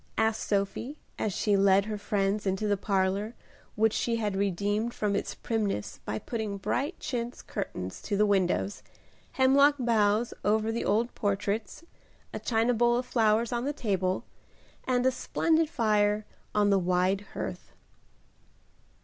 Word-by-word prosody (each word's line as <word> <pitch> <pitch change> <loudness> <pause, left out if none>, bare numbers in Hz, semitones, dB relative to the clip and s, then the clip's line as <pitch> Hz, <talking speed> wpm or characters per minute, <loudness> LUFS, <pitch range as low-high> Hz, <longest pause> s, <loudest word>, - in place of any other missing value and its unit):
asked 220 0 +1
Sophie, 205 +8 -1 0.2
as 215 - 0
she 205 +2 +1
led 195 0 +4
her 215 0 -3
friends 205 0 -1
into 195 +3 0
the 205 - +3
parlor, 195 +3 0 0.4
which 220 0 +3
she 235 - 0
had 210 -3 -1
redeemed 205 +4 0
from 205 -1 0
its - - -3
primness 200 - -2
by 105 - -2
putting 215 - -4
bright 285 - -2
chintz 240 -1 -4
curtains 95 - -5
to 205 - -2
the 210 - +4
windows, 195 0 +1 0.5
hemlock 280 +2 +5
boughs 225 -2 +2
over 215 +2 +2
the 230 - -2
old 230 +3 +1
portraits, 205 +5 -2 0.5
a - - -3
china 230 +1 +1
bowl 240 +1 +3
of 250 - -2
flowers 225 -1 +2
on 240 0 -1
the 285 +2 -1
table, 190 -8 -1 0.6
and 250 -1 +1
a 260 - +5
splendid 320 +4 +1
fire 210 -5 +2 0.3
on 205 -1 +3
the 195 - +4
wide 185 +2 +1
hearth. - - -5
210 Hz, 150 wpm, -28 LUFS, 200-235 Hz, 0.6 s, hemlock